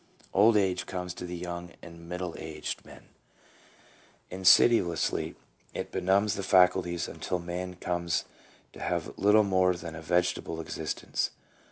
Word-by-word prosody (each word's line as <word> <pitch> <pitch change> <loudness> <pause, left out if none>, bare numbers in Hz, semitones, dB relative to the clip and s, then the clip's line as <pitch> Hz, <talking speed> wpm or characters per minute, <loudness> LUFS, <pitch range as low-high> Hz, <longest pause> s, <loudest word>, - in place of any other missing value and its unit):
Old 105 +3 +6
age 95 -3 +1
comes 90 -1 -4
to 90 - -7
the 90 - -5
young 85 0 -6
and 85 0 -11
middle 90 -1 -4
aged 75 -1 -5
man; - - -15 1.2
in 95 +1 -6
sidiously 90 -5 +4 0.4
it - - -4
benumbs 95 +3 +2
the 100 - -3
faculties 90 -2 +3
until 90 - -3
man 90 +1 -5
comes 85 -1 -1 0.5
to - - -12
have - - -2
little 105 +2 +5
more 95 -2 +3
than 85 -2 -7
a 80 - -8
vegetable 85 0 0
existence. 80 -1 -3
90 Hz, 140 wpm, -29 LUFS, 85-95 Hz, 1.2 s, Old